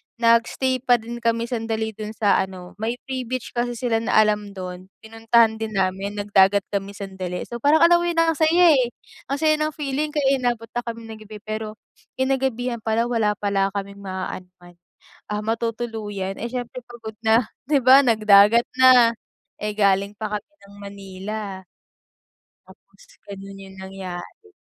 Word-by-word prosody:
nag-stay 235 +3 +2
pa 245 -2 +5
din 235 +1 -6
kami 230 -1 0
sandali 225 -2 -2
doon 215 0 -6
sa 205 -1 +2
ano 185 -1 -10
may 225 +4 -3
free 260 -1 -3
beach 250 0 -5
kasi 240 0 0
sila 230 -2 0
na - - -2
alam 210 -1 +1
doon, 185 0 -7 0.2
pinuntahan 225 0 +2
din 220 -1 -4
namin, 195 +2 -1
nag-dagat 200 -1 +3
kami 200 0 -3
sandali. 190 -2 -5
So 240 0 -6
parang 295 +5 +4
alam 345 0 +6
mo 345 - -1
yun, 340 -1 -2
ang 330 0 +3
saya, 330 +1 +5
eh, 240 -2 -1 0.3
ang 275 - -1
saya 310 -1 +3
ng 305 0 -1
feeling, 295 +1 -2
kaya 275 -2 +2
inabot 235 -2 -2
na 240 - -2
kaming 230 -1 -6
ng 215 - -11
gabi 215 -1 -9
pero 215 0 -4 0.5
kinagabihan 260 -2 -1
pala, 225 +2 0
wala 210 -3 +1
pala 195 -1 0
kaming 200 0 -6
ma-aanuhan, 180 -2 -7 0.5
ah, 210 0 -3
matutuluyan, 220 -4 -3
eh, 235 - -3
siyempre 245 0 -5
pagod 225 -3 -9
na, 225 +1 +2 0.2
'di 290 -2 +3
ba? 260 +2 +8
Nag-dagat 215 -2 +5 0.2
na, 250 -3 +7 0.5
eh, 210 0 -3
galing 200 0 +2
pa 215 0 -5
kami 295 +9 -34
ng 200 0 -16
Manila. 200 0 -7 1.1
Tapos - - -20 0.2
ganon 195 0 -9
'yung 190 0 -12
nangyari. 190 - -8
220 Hz, 165 wpm, -22 LUFS, 200-245 Hz, 1.1 s, ba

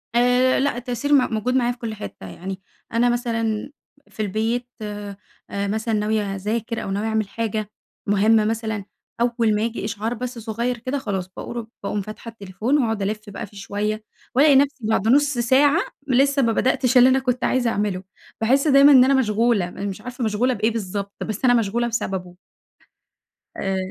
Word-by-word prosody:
آآ 250 +1 +4
لأ، 270 -3 0
تأثير 250 +4 -2
م 255 -4 +4
موجود 250 +4 0
معايا 245 -1 +2
في 245 - -8
كل 225 -2 -5
حتة 100 - -8
يعني. 190 - -7 0.3
أنا 240 +1 +3
مثلًا 230 0 -1 0.4
في 215 - -6
البيت، 225 +4 -1 0.8
مثلًا 215 +3 -2
ناوية 210 -2 0
أذاكر 225 +4 -3
أو 195 - -4
ناوية 205 +3 -1
أعمل 220 -2 0
حاجة 215 -1 -3 0.4
مُهمة 210 +2 +4
مثلًا، 220 -2 -2 0.4
أول 235 -3 +2
ما 210 - 0
ييجي 230 -2 -2
إشعار 215 +2 -2
بس 245 0 -5
صغير 235 +2 -2
كده؛ 255 +5 -3
خلاص 190 -7 -3
باقو 235 -1 -5 0.2
باقوم 205 0 -2
فاتحة 215 +3 -8
التليفون 215 +6 -1
وأقعد 225 -3 -1
ألِف 210 +2 -1
بقى 200 - -6
فيه 205 - -16
شوية، 210 +2 -3 0.3
والاقي 285 +1 +6
نفسي 275 -4 +2
بعد 220 -1 +1
نُص 290 +3 +4
ساعة، 275 +6 +4 0.3
لسة 275 +2 +3
ما 230 -3 +2
بدأتش 255 +1 +2
اللي 250 +1 +8
أنا 265 - +3
كنت 250 -1 -1
عايزة 250 -2 +2
أعمله. 205 -4 -1 0.4
باحس 270 +7 +3
دايمًا 280 +1 +7
إن 260 -3 +8
أنا 275 - +3
مشغولة، 225 -5 +2
أنا 195 +3 -6
مش 195 -2 -5
عارفة 250 0 -6
مشغولة 225 +4 +1
بإيه 220 0 +1
بالضبط؟ 200 -2 -4
بس 220 +4 -3
أنا 245 - +6
مشغولة 235 +1 +1
بسببه. 190 -6 -3 1.2
آآ، 195 -1 -1
225 Hz, 175 wpm, -22 LUFS, 210-250 Hz, 1.2 s, اللي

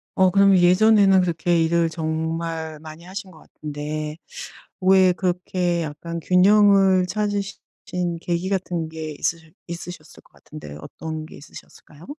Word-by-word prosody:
어 185 -1 +4
그러면 195 0 +5
예전에는 195 +2 +5
그렇게 170 -1 +1
일을 165 0 +1
정말 160 0 -4
많이 155 +1 -11
하신 190 +1 -8
것 - - -16
같은데 150 +1 -6 0.6
왜 185 0 +5
그렇게 180 -1 -1
약간 165 +3 -6
균형을 195 +1 +4
찾으시 205 0 -3 0.3
신 175 -2 -3
계기 175 +2 -2
같은 180 -4 -2
게 160 -1 -6
있으셔 165 -1 -2 0.2
있으셨을 170 -2 -9
것 - - -27
같은데 135 - -11
어떤 155 - -7
게 - - -13
있으셨을까요? 145 +2 -15
170 Hz, 300 characters per minute, -22 LUFS, 160-185 Hz, 0.6 s, 그러면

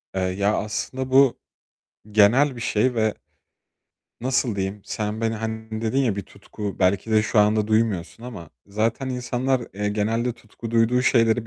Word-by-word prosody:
Eee, 95 - 0
ya, 100 +3 0
aslında 130 +5 -3
bu, 135 -1 +5 0.7
genel 120 +6 +4
bir - - -7
şey 120 +2 +1
ve, 110 -2 +1 1.1
nasıl 125 -3 0
diyeyim, 95 +1 -3
sen 105 +1 -3
beni, 115 0 0
hani, 110 0 -5
dedin 115 +4 0
ya, 120 -7 +1
bir 100 - -3
tutku, 100 +1 -7
belki 95 +3 +1
de 110 -1 +4
şu 110 - 0
anda 105 0 +3
duymuyorsun 110 -3 0
ama 110 -11 -9 0.2
zaten 110 +6 -1
insanlar, 125 +1 -1
eee, 105 +1 -1
genelde 115 +4 0
tutku 115 0 -10
duyduğu 115 +2 +3
şeyleri 115 -2 +3
110 Hz, 155 wpm, -23 LUFS, 105-120 Hz, 1.1 s, bu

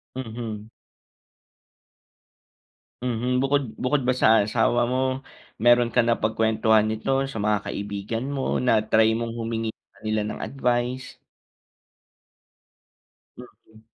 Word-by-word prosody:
Mhm. 110 -3 -6 2.3
Mhm, 125 +1 0
bukod 140 +1 +2 0.2
bukod 140 +3 +2
ba 130 - +4
sa 110 -4 +4
asawa 120 +2 +2
mo, 125 +1 -1 0.6
mayro'ng 120 0 +5
ka 125 - +5
napagkwentuhan 110 -1 +2
nito 110 +3 -2 0.2
sa 135 -4 -6
mga 105 0 +2
kaibigan 100 +4 -4
mo, 135 -2 -1
na-try 110 -2 +3
mong 115 0 -4
humingi 115 -1 -2
sa - - -73
ka - - -22
nila 110 0 0
ng - - -7
advice? 125 -1 -2 2.2
Mm. 110 -3 -16
115 Hz, 105 wpm, -24 LUFS, 110-125 Hz, 2.3 s, mayro'ng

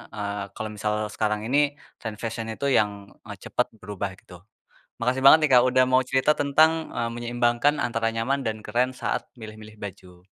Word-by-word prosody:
eee, 100 -1 -3
kalau 110 - -4
misal 105 0 -1 0.2
sekarang 105 -1 -1
ini, 140 +4 +3 0.4
tren 110 -2 -6
fashion 115 +1 -5
itu 140 - -4
yang, 105 -5 +3 0.4
eee, - - -7
cepet - - 0
berubah 95 -2 -5
gitu. 90 -2 -15 0.6
Makasih 125 +2 0
banget 155 - +10
nih, - - -5
Kak, 120 - +5
udah 130 0 +4
mau 130 0 +4
cerita 135 +3 +3
tentang, 145 +3 +4 0.2
eee, 115 - -1
menyeimbangkan 120 +3 +1
antara 115 -2 -1
nyaman 130 +4 -1
dan 110 -1 -3
keren 125 +4 +1
saat 125 -1 -3
milih-milih 110 -1 -11
baju. 90 -3 -10
115 Hz, 175 wpm, -25 LUFS, 105-130 Hz, 0.6 s, banget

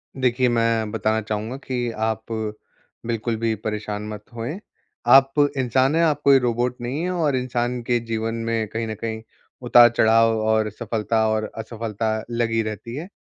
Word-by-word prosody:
देखिए, 125 -1 +2
मैं 115 -2 +1
बताना 110 0 0
चाहूँगा 110 +3 -4
कि 125 -3 -3
आप 110 0 -2 0.8
बिल्कुल 115 0 -1
भी 115 0 0
परेशान 105 0 -4
मत 105 -1 -7
होएँ, 120 - -4 0.5
आप 135 +2 +7 0.2
इंसान 130 +3 +2
हैं, 165 - +3
आप 150 -3 +1
कोई 140 -1 +6
रोबोट 120 0 0
नहीं 125 +6 -3
है 180 - -1
और 160 -6 +1
इंसान 125 -1 -1
के 120 -1 +2
जीवन 115 -1 -3
में 115 -1 -1
कहीं 115 +2 -4
न 110 - -3
कहीं 110 -1 -3 0.4
उतार-चढ़ाव 115 -2 +5
और 110 0 +2
सफलता 110 0 -1
और 110 0 -1
असफलता 110 -1 -3
लगी 115 -1 0
रहती 110 +3 -6
है। 155 +5 -6
115 Hz, 160 wpm, -23 LUFS, 110-125 Hz, 0.8 s, आप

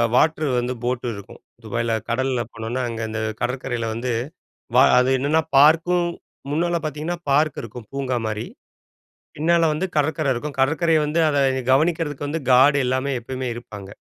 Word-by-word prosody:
Water 155 +2 +2
வந்து 120 +1 -2
ஃபோட்டு 125 0 -2
இருக்கும். 100 +1 -11 0.2
துபாயில 115 +1 -2 0.2
கடல 125 0 0
போனோனா, 115 +3 -4
அங்க 115 -1 -5
அந்த 110 0 -4 0.2
கடற்கரைல 120 -1 -2
வந்து 120 +3 -3 0.9
அது 125 +1 +3
என்னன்னா 150 +5 +2 0.2
பார்க்கும், 165 +4 +4 0.4
முன்னால 170 +3 0
பார்த்தீங்கன்னா 155 +3 -3
பார்க் 150 +2 +2
இருக்கும் 115 -1 -10
பூங்கா 135 -2 -1
மாரி. 110 0 -3 0.9
பின்னால 165 +2 +2
வந்து 155 +5 -1
கடற்கரை 150 0 +1
இருக்கும். 140 +3 -5
கடற்கரைய 160 +4 +3
வந்து 150 +3 -1
அத 145 - 0 0.4
கவனிக்கிறதுக்கு 150 -1 0
வந்து 160 +2 -3
காட் 135 +3 +6
எல்லாமே 130 +2 0
எப்பவுமே 130 +2 -5
இருப்பாங்க. 105 -4 -9
135 Hz, 140 wpm, -22 LUFS, 120-155 Hz, 0.9 s, காட்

